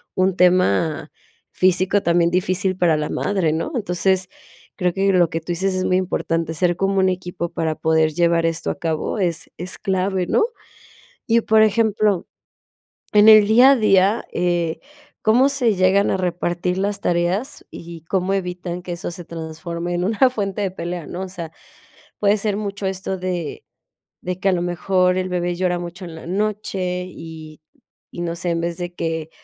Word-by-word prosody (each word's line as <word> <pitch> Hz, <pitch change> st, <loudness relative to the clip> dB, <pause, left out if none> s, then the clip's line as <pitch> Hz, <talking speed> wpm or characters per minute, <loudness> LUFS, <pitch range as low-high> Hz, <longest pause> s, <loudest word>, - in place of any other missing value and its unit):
un 185 Hz, 0 st, +2 dB
tema 170 Hz, -, +2 dB, 0.4 s
físico 185 Hz, +2 st, +2 dB
también 170 Hz, 0 st, +2 dB
difícil 185 Hz, +1 st, 0 dB
para 170 Hz, -4 st, +3 dB
la 150 Hz, -, -2 dB
madre, 185 Hz, -6 st, 0 dB
¿no? 165 Hz, -, -2 dB
Entonces 190 Hz, -3 st, 0 dB, 0.5 s
creo 180 Hz, -1 st, +1 dB
que 195 Hz, 0 st, +1 dB
lo 175 Hz, -3 st, +4 dB
que 165 Hz, -, -2 dB
tú 175 Hz, +2 st, -3 dB
dices 190 Hz, +2 st, -1 dB
es 185 Hz, -, -1 dB
muy 185 Hz, -, +2 dB
importante: 165 Hz, -3 st, -1 dB
ser 175 Hz, +1 st, +1 dB
como 195 Hz, 0 st, +1 dB
un 190 Hz, -, +3 dB
equipo 180 Hz, -1 st, -4 dB
para 160 Hz, -1 st, -1 dB
poder 160 Hz, 0 st, +2 dB
llevar 170 Hz, 0 st, +2 dB
esto 165 Hz, +1 st, -1 dB
a -, -, -8 dB
cabo 165 Hz, +5 st, -2 dB
es 175 Hz, -4 st, -1 dB
es 180 Hz, +2 st, -4 dB
clave, 190 Hz, -1 st, -1 dB
¿no? 440 Hz, -, +3 dB, 0.8 s
Y 230 Hz, 0 st, +4 dB
por 220 Hz, 0 st, +4 dB
ejemplo, 215 Hz, -3 st, +2 dB, 0.9 s
en 210 Hz, +1 st, +6 dB
el 215 Hz, -1 st, +9 dB
día 250 Hz, +5 st, +7 dB
a -, -, +4 dB
día, 205 Hz, -1 st, +3 dB
eh, 175 Hz, -2 st, -1 dB, 0.4 s
¿cómo 245 Hz, +5 st, +4 dB
se 245 Hz, -6 st, +2 dB
llegan 190 Hz, +2 st, +3 dB
a -, -, +1 dB
repartir 180 Hz, 0 st, -1 dB
las 200 Hz, +1 st, -1 dB
tareas 180 Hz, +11 st, -1 dB
y 170 Hz, -1 st, -10 dB
cómo 185 Hz, +2 st, -1 dB
evitan 180 Hz, -1 st, -4 dB
que 175 Hz, 0 st, -6 dB
eso 175 Hz, +1 st, -4 dB
se 175 Hz, 0 st, -8 dB
transforme 170 Hz, +1 st, -5 dB
en 175 Hz, +1 st, -1 dB
una 225 Hz, +6 st, +3 dB
fuente 205 Hz, -3 st, -3 dB
de 195 Hz, -, -1 dB
pelea? 175 Hz, -2 st, -5 dB
¿no? 180 Hz, +2 st, -6 dB
O 190 Hz, -, -5 dB
sea, 170 Hz, -3 st, -7 dB, 0.7 s
puede 205 Hz, 0 st, +3 dB
ser 205 Hz, -1 st, -1 dB
mucho 200 Hz, -1 st, -4 dB
esto 190 Hz, 0 st, -3 dB
de 180 Hz, -4 st, -4 dB, 0.6 s
de 180 Hz, 0 st, -4 dB
que 195 Hz, -, +1 dB
a -, -, 0 dB
lo 175 Hz, -, 0 dB
mejor 180 Hz, +1 st, +1 dB
el 185 Hz, 0 st, -2 dB
bebé 175 Hz, 0 st, -1 dB
llora 180 Hz, -1 st, 0 dB
mucho 175 Hz, +2 st, -7 dB
en 165 Hz, -, -9 dB
la 160 Hz, -, -10 dB
noche 190 Hz, -2 st, -2 dB
y 160 Hz, -3 st, -10 dB, 0.5 s
y 175 Hz, -, -5 dB
no 170 Hz, -1 st, -2 dB
sé, 175 Hz, 0 st, -2 dB
en 170 Hz, 0 st, 0 dB
vez 170 Hz, 0 st, -2 dB
de 175 Hz, 0 st, -5 dB
que 160 Hz, -2 st, -3 dB
180 Hz, 180 wpm, -21 LUFS, 170-195 Hz, 0.9 s, el